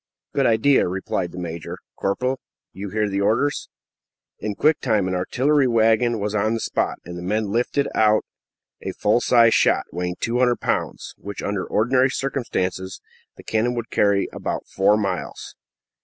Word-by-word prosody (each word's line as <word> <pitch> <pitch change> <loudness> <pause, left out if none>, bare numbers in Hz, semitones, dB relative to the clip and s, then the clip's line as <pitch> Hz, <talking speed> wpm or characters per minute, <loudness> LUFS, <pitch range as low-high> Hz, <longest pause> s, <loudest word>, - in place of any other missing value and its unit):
"A - - -12
good 135 - +3
idea!" 125 +3 +4
replied 90 -1 -2
the 90 - -10
major. 85 -2 -5 0.2
"Corporal, 125 +7 -1 0.3
you 100 +2 -6
hear 105 +1 0
the 100 0 -1
orders." 120 +8 +1 0.7
In 105 -1 -3
quick 155 +6 +3
time 100 -3 +1
an 95 - -2
artillery 130 +10 +2
wagon 115 0 +3
was 105 +1 -2
on 110 +2 +1
the - - -2
spot, - - -1
and 90 0 -7
the - - -7
men 105 +3 -1
lifted 125 +5 0
out 110 0 +3 0.6
a - - -4
full 105 +4 +2
sized 115 -2 +5
shot, - - +3
weighing 90 0 -3
200 120 +1 +1
lbs., - - -2
which, 100 0 -7
under 100 -2 -1
ordinary 130 +4 +2
circumstances, 95 -9 -3 0.4
the - - -12
cannon 115 +3 0
would 115 -1 -5
carry 100 -1 +2
about - - -4
four 100 +2 +2
miles. 100 -2 -4
110 Hz, 165 wpm, -22 LUFS, 95-120 Hz, 0.7 s, sized